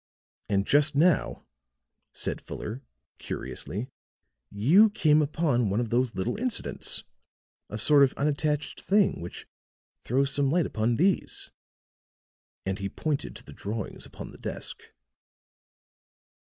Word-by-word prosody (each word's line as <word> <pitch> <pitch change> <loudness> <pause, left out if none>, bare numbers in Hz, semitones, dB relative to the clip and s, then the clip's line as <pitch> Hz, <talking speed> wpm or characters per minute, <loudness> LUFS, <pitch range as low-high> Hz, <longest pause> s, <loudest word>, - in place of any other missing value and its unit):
"And 100 -1 +1
just 145 +3 +4
now," 165 +1 +2 0.7
said - - -3
Fuller, 115 +5 -6 0.4
curiously, 105 +7 -5 0.6
"you 160 - +5
came 155 -6 +3
upon 145 -7 +1
one 100 +3 0
of 120 -2 -2
these 120 -2 +1
little 95 - -2
incidents, 250 -2 -1 0.7
a 105 - -5
sort 145 +6 +7
of 135 -2 +5
unattached 150 +1 -1
thing, 200 - +2
which 85 - -8 0.6
throws 135 +3 +1
some 140 -1 +2
light 170 +2 +2
upon 115 +1 0
these," 185 +8 0 1.1
and 95 +1 -2
he 100 0 -3
pointed 150 +6 -3
to - - -11
the - - -12
drawings 110 +2 -5
upon - - -9
the - - -14
desk. - - -4
140 Hz, 125 wpm, -27 LUFS, 110-155 Hz, 1.1 s, sort